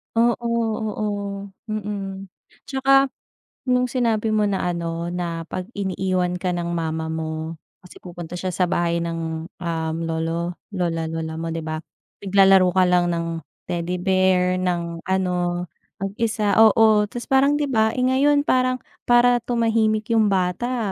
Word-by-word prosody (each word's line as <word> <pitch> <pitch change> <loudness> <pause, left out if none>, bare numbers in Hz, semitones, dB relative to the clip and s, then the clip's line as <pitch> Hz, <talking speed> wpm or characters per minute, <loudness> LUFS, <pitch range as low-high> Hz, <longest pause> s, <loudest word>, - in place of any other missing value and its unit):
Oo, 235 +1 +2 0.3
oo, 215 -1 -2 0.6
mm. 200 -2 -4 0.4
'Tsaka, 270 0 +3 0.6
nung 250 0 +3
sinabi 230 -3 0
mo 210 -1 +3
na 185 -2 0
ano, 170 0 -3
na 170 -2 -3
'pag 185 +4 -6
iniiwan 185 -2 -1
ka 185 - 0
ng 170 0 -3
mama 160 -1 -2
mo 160 0 -4 0.3
kasi - - -15
pupunta 175 -1 -8
siya 185 +1 -3
sa 180 +1 +1
bahay 170 -1 0
ng, 165 -1 -4 0.2
um, 160 -2 -2
lolo, 165 +2 -2 0.2
lola, 165 -3 -1
lola 160 0 -4
mo 165 0 -3
'di 165 - -3
ba, 155 0 -4 0.5
naglalaro 195 -1 +6
ka 185 -1 +4
lang 180 -1 +3
ng 170 0 -2 0.4
teddy 175 +1 -2
bear, 185 -1 +2
ng 170 -2 -2
ano, 180 -1 0 0.4
mag-isa 210 +1 0
oo 220 -1 +6
ta's 240 +3 -8
parang 270 +2 +4
'di 290 -1 0
ba, 220 -2 +2
eh, 250 - -2
ngayon 280 +3 +3
parang 255 -2 +1 0.2
para 245 0 +5
tumahimik 225 -2 +1
yung 220 -2 +4
bata 200 +4 -1
185 Hz, 145 wpm, -22 LUFS, 170-220 Hz, 0.6 s, naglalaro